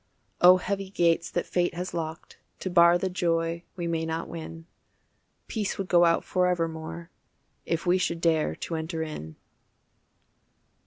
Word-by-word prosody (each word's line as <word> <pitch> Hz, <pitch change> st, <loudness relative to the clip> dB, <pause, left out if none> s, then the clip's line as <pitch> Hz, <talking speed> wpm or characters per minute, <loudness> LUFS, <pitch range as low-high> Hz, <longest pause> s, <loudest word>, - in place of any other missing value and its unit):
Oh 180 Hz, +1 st, +9 dB
heavy 195 Hz, +1 st, -3 dB
gates 170 Hz, -3 st, +2 dB
that 175 Hz, -, -2 dB
fate 175 Hz, -1 st, 0 dB
has 180 Hz, +2 st, -4 dB
locked 160 Hz, -1 st, -6 dB, 0.2 s
To 185 Hz, -, -3 dB
bar 170 Hz, -1 st, +6 dB
the 190 Hz, -, -1 dB
joy 170 Hz, -2 st, 0 dB
we 175 Hz, -2 st, -4 dB
may 165 Hz, -1 st, -1 dB
not 160 Hz, +1 st, -3 dB
win, 165 Hz, 0 st, -8 dB, 0.8 s
Peace 210 Hz, -4 st, -3 dB
would 195 Hz, -2 st, -4 dB
go 175 Hz, -1 st, +6 dB
out 165 Hz, 0 st, +3 dB
forevermore 170 Hz, -2 st, -1 dB, 0.6 s
If 165 Hz, +1 st, -1 dB
we 180 Hz, +1 st, +3 dB
should 170 Hz, -1 st, -1 dB
dare 165 Hz, -2 st, +1 dB
to -, -, -6 dB
enter 160 Hz, 0 st, -3 dB
in. 80 Hz, -, -7 dB
170 Hz, 150 wpm, -27 LUFS, 165-180 Hz, 0.8 s, Oh